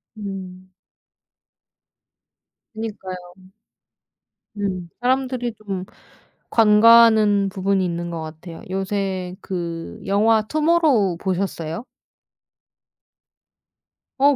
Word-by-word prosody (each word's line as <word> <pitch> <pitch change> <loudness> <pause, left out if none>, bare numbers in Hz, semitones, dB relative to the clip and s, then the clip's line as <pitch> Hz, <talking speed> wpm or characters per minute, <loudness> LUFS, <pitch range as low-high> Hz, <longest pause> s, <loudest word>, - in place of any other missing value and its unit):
음. 190 -3 -8 2.0
그니까요. 190 -5 -6 1.3
음. 185 -4 -3
사람들이 255 -2 0
좀 195 -4 -6 0.6
간과하는 215 -2 +6
부분이 190 0 0
있는 170 0 -3
것 165 -1 -4
같아요. 160 +2 -9
요새 190 -1 -2
그 170 -3 -5
영화 215 +3 +3
투모로우 300 - +2
보셨어요? 185 -1 -3 2.4
어 280 0 +5
195 Hz, 160 characters per minute, -22 LUFS, 185-225 Hz, 2.4 s, 간과하는